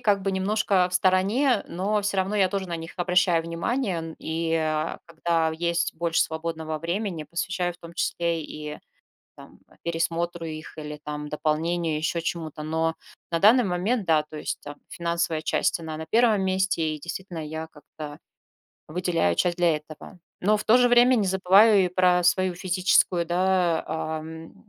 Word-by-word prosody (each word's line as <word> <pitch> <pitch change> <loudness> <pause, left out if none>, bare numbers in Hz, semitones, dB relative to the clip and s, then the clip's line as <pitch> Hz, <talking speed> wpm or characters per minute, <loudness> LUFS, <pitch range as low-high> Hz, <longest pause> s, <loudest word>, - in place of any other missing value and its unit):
как 205 -5 +2
бы, 195 0 -1
немножко 190 -1 +1
в - - -6
стороне, 195 +7 +2
но 205 +4 -1
всё 200 -1 -1
равно, 190 +2 0
я 195 -2 +4
тоже 195 -1 -3
на 170 - -3
них 165 +1 -8
обращаю 180 -1 +3
внимание. 170 0 -2
И 165 +1 -2 0.5
когда 165 -1 0
есть 170 0 0
больше 165 0 0
свободного 160 -1 -2
времени, 175 +1 -3
посвящаю 175 +3 -2
в 175 - -20
том 170 -1 -12
числе 170 -1 -1
и, 150 0 -7 0.6
там, - - -15 0.2
пересмотру 170 0 -2
их, 155 0 -8
или, 150 -1 -7
там, 150 0 -5
дополнению, 160 +2 -1
еще 160 +2 -1
чему 165 -1 -3
то. 150 - -9
Но 160 +1 -1 0.4
на 165 - +1
данный 230 +7 +6
момент- 195 +4 0
да, 160 -2 +4
то 155 0 -10
есть, - - -4
там, 145 0 -8
финансовая 170 -2 -1
часть- 155 - 0
она 160 -2 -6
на 160 - -6
1 225 0 +3
месте, 185 -4 0
и, - - -10
действительно, 175 +2 -6
я, 160 +1 -5
как-то 150 -1 -10 0.7
выделяю 165 - 0
часть 175 - +1
для 170 -3 +3
этого. 155 +4 -11 0.2
Но 210 +3 +4
в - - -5
то 225 - +6
же 245 -1 +5
время 245 +1 +6
не 215 -5 +1
забываю 190 +2 +5
и - - -2
про 180 0 +3
свою 185 +1 +2
физическую, 180 -1 +2
да, 180 -1 +1
ам, 160 +1 -5
170 Hz, 170 wpm, -25 LUFS, 160-190 Hz, 0.7 s, данный